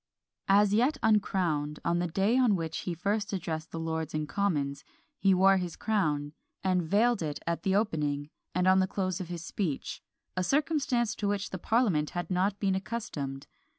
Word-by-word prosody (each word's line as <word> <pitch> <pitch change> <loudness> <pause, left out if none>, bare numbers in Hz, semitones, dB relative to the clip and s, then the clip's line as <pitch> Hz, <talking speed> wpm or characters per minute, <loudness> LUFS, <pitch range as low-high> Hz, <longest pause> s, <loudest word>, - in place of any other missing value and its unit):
As 200 +1 +5
yet 255 +7 +3
uncrowned, 175 -9 +1
on 170 0 +2
the 175 - 0
day 195 +7 +1
on 250 -5 +4
which 160 -2 -3
he 170 - -2
first 200 +4 -1
addressed 160 -4 -3
the 165 - -5
Lords 160 -1 -3
and 155 0 -1
Commons, 145 -9 -1 0.4
he 195 - +4
wore 190 +1 +5
his 180 -3 -3
crown, 150 -9 0 0.3
and 185 -1 +2
vailed 210 +6 +2
it 150 -2 -2
at 170 0 -1
the 190 -1 +1
opening, 150 -8 0 0.2
and 180 0 +2
on 190 0 +6
the 185 - +2
close 185 -1 -2
of 180 - -5
his 170 -2 -5
speech; 170 -9 -3 0.3
a 185 - 0
circumstance 275 - +1
to 205 - -3
which 200 -1 -1
the 190 - -4
parliament 195 -9 +2
had 175 0 -3
not 190 +2 +1
been 195 -2 +1
accustomed. 190 -10 -4
185 Hz, 185 wpm, -29 LUFS, 160-205 Hz, 0.4 s, on